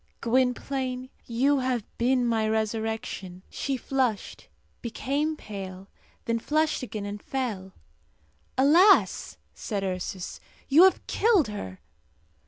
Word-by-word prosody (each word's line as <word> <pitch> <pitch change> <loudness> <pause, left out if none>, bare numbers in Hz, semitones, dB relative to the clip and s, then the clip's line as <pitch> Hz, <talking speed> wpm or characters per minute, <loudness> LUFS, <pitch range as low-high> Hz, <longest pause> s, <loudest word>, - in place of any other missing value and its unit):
Gwynplaine, 255 +1 0
you 270 +4 +2
have 255 -4 -1
been 250 +1 +2
my 225 -2 +1
resurrection." 220 -4 -3
She 275 -1 -2
flushed, 255 -5 -2 0.3
became 285 +6 -2
pale, 195 -4 -8 0.4
then 230 0 0
flushed 310 +5 +1
again, 215 -5 -5
and 205 0 -6
fell. 215 -8 -4 0.8
"Alas!" 335 +10 +5 0.2
said 205 -3 -4
Ursus, 185 0 -4 0.3
"you 315 +7 +7
have 380 - +2
killed 405 - +3
her." 95 - -7
240 Hz, 105 wpm, -27 LUFS, 210-270 Hz, 0.8 s, you